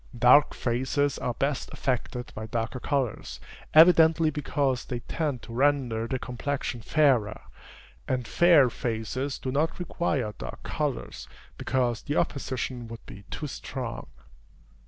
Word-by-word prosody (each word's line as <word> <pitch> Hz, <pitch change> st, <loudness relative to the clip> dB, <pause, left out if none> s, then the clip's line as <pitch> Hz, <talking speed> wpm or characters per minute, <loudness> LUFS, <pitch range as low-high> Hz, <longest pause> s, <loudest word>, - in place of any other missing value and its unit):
Dark 125 Hz, +5 st, +6 dB
faces 130 Hz, +3 st, 0 dB
are 120 Hz, -, -2 dB
best 140 Hz, +1 st, -1 dB
affected 125 Hz, -1 st, -3 dB
by 110 Hz, +1 st, -6 dB
darker 115 Hz, +3 st, -3 dB
colors, 130 Hz, -3 st, -2 dB, 0.3 s
evidently 160 Hz, -1 st, +6 dB
because 140 Hz, -3 st, -1 dB
they 120 Hz, -2 st, -4 dB
tend 145 Hz, -1 st, -3 dB
to 115 Hz, -, -9 dB
render 125 Hz, -4 st, +1 dB
the 130 Hz, -, -1 dB
complexion 125 Hz, 0 st, -4 dB
fairer; 125 Hz, -6 st, +2 dB, 0.7 s
and 125 Hz, -2 st, -1 dB
fair 160 Hz, -8 st, +5 dB
faces 120 Hz, +5 st, -3 dB
do 130 Hz, -, -4 dB
not 155 Hz, +4 st, 0 dB
require 150 Hz, -10 st, -2 dB
dark -, -, -7 dB
colors, -, -, -3 dB, 0.3 s
because 125 Hz, -3 st, -1 dB
the 145 Hz, -, -3 dB
opposition 130 Hz, -3 st, -2 dB
would 115 Hz, 0 st, -10 dB
be 100 Hz, 0 st, -12 dB
too 150 Hz, -, -5 dB
strong. 130 Hz, -3 st, -6 dB
130 Hz, 130 wpm, -27 LUFS, 120-145 Hz, 0.7 s, Dark